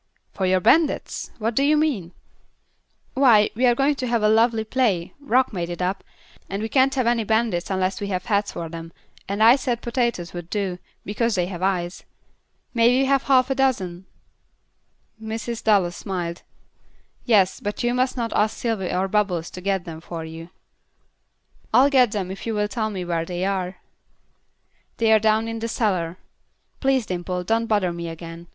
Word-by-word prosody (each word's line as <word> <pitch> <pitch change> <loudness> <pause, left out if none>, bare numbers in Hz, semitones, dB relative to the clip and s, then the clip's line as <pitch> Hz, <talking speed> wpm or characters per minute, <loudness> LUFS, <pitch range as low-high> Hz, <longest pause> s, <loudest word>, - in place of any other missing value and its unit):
"For 190 - -1
your 185 0 +2
bandits! 315 - +2
What 225 +1 -1
do 270 - +1
you 300 +2 +4
mean?" 255 - 0 1.0
"Why, 235 -6 +5
we 250 +3 +2
are 240 - +4
going 275 +3 +2
to 255 - -1
have 235 -2 0
a - - +5
lovely 225 0 +3
play 220 -7 0
Rock 260 -3 +1
made 175 -3 -3
it 175 - -5
up 185 +2 -2 0.5
and 195 +2 -3
we 220 - -3
can't 270 +2 +3
have 255 -2 +1
any 235 -1 +2
bandits 220 -5 0
unless 190 0 -1
we 200 - -2
have 185 -2 -3
heads 205 -1 0
for 165 - -5
them, 165 0 -9 0.4
and 200 +2 +1
I 235 +3 +8
said 250 -4 -2
potatoes 235 -8 -1
would 175 -1 -7
do, 190 -2 -2 0.3
because 225 +2 0
they 180 -2 +1
have 180 -1 -7
eyes. 185 -2 -1 0.7
May 230 -1 +4
we 270 - +3
have 275 0 +3
half 265 -1 +3
a - - +4
dozen?" 190 -10 -1 1.1
Mrs. 225 +1 -5
Dallas 195 -5 +2
smiled. 175 -3 -4 0.8
"Yes, 200 -6 +3
but 205 +3 -4
you 240 0 +1
must 255 +1 0
not 230 -2 -2
ask 215 +1 +1
Sylvy 220 -6 -2
or 185 +1 0
Bubbles 190 -5 0
to 180 - -8
get 195 -1 -1
them 160 -2 -8
for 165 -1 -6
you." 165 +1 -9 1.3
"I'll 270 +4 +6
get 250 -5 +4
them 190 -3 -3
if 195 - -7
you 225 - -1
will 210 0 +1
tell 220 0 -2
me 190 -4 -5
where 170 -1 -1
they 180 +2 -3
are." 190 -1 -2 1.2
"They 225 -1 +2
are 220 - +6
down 220 +1 +2
in 225 0 -4
the 230 - -3
cellar. 185 -7 -1 0.6
Please, 265 -3 +1
Dimple, 180 -1 -3
don't 225 +4 0
bother 205 -5 +1
me 170 0 -5
again. 165 +1 -9
210 Hz, 185 wpm, -23 LUFS, 180-235 Hz, 1.3 s, I